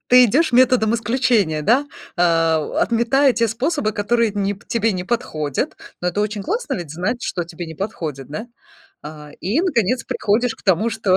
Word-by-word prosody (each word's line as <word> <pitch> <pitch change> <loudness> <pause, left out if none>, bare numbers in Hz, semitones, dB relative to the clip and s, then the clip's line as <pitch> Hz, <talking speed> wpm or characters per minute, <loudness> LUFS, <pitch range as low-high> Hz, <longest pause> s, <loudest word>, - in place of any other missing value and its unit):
ты 250 0 +8
идешь 270 +6 +2
методом 245 -3 +4
исключения, 230 -9 +1
да. 260 - +3 0.3
А, 165 -2 +3
у - - -6
отметая 250 +4 +3
те 230 -1 +1
способы, 250 +1 -1
которые 225 +2 +1
не 200 0 -1
п 200 - -21
тебе 225 -2 +1
не 180 -1 -4
подходят. 155 - -2 0.3
Но 180 - +1
это 205 - -1
очень 210 -1 -2
классно 450 +8 -2
ведь 175 -5 -6
знать, 205 +9 -2
что 175 - -2
тебе 170 +1 -8
не 160 - -8
подходит, 155 - -5
да? 210 +11 -6 0.6
А, 150 -1 -10
и, 220 - +1
наконец, 250 - 0
приходишь 225 +3 0
к - - -21
тому, 200 +4 +2
что 210 -4 +1
215 Hz, 185 wpm, -20 LUFS, 175-240 Hz, 0.6 s, ты